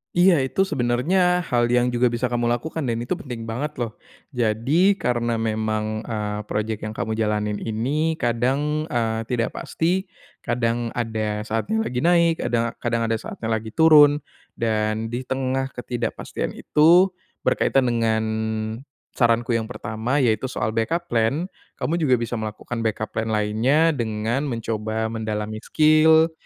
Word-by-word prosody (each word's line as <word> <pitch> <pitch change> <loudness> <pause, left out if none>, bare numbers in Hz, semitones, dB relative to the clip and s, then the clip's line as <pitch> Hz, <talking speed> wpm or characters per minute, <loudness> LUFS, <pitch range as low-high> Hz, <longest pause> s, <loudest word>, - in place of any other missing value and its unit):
Iya, 175 -5 +5
itu 190 +9 0
sebenarnya 160 +7 +2
hal 120 -2 +1
yang 125 0 +3
juga 120 0 +2
bisa 120 +2 -1
kamu 120 0 0
lakukan 160 +6 -2
dan 115 -3 -1
itu 120 - -2
penting 115 -4 -7
banget 145 +7 -4
loh. 115 -3 -3 0.4
Jadi, 130 - +2
karena 120 -2 0
memang, 110 0 -1
eee, 105 -2 -3
projek 105 0 -2
yang 105 - -3
kamu 110 0 -3
jalanin 105 -1 0
ini 140 +10 -1
kadang, 135 +6 0
eee, 115 -1 0
tidak 115 0 -2
pasti, 180 +4 -1 0.4
kadang 120 -1 -1
ada 110 -2 -2
saatnya 150 - -1
lagi 125 +2 -2
naik, 170 -1 +3
kadang 115 -1 0
kadang 115 -1 0
ada 115 - +1
saatnya 110 0 -6
lagi 110 0 -5
turun. 150 0 +6 0.3
Dan 110 -1 -1
di 120 +3 -4
tengah 130 +1 -2
ketidakpastian 120 -2 -4
itu, 170 +5 +5 0.3
berkaitan 135 -2 +2
dengan, 115 -2 +1 0.9
saranku 120 0 +2
yang 115 -1 0
pertama 110 +4 -2
yaitu 115 +2 +1
soal 110 -3 -1
backup 165 +10 -1
plan, 115 +7 +1 0.4
kamu 170 +3 -1
juga 135 -5 +3
bisa 120 0 -3
melakukan 110 +2 -5
backup 110 -1 -2
plan 110 0 -1
lainnya 115 +10 +2
dengan 115 0 -1
mencoba 110 -2 -2
mendalami 110 -1 -3
skill, 155 +4 +4
120 Hz, 145 wpm, -23 LUFS, 110-140 Hz, 0.9 s, turun